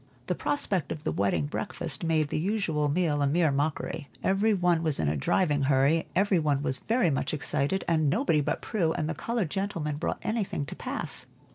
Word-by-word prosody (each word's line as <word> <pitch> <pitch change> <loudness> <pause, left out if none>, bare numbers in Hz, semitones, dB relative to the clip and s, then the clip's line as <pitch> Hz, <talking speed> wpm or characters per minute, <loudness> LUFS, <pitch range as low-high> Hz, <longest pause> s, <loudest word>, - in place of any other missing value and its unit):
The - - 0
prospect 190 - 0
of 150 - -5
the - - -1
wedding 100 - +1
breakfast 170 -1 -4
made 160 -3 +1
the - - -1
usual 165 -6 0
meal 150 -2 +1
a 140 - +3
mere 160 +1 +3
mockery. 145 +1 -2
Every 200 +3 +3
one 175 -4 +2
was 155 -4 0
in 80 - +1
a 75 - +1
driving 145 - +1
hurry, 140 +4 +3
every 195 -1 +3
one 145 -3 +1
was 130 -2 -1
very 230 - +1
much 135 +2 -1
excited, 150 +5 0
and 155 -3 +2
nobody 165 - +2
but - - -2
Prue 175 -8 0
and 155 -3 -2
the 160 - -1
colored 225 -4 -2
gentlemen 170 -7 -2
brought - - -2
anything 215 -9 -1
to - - -7
pass. - - -4
160 Hz, 200 wpm, -28 LUFS, 145-185 Hz, -, a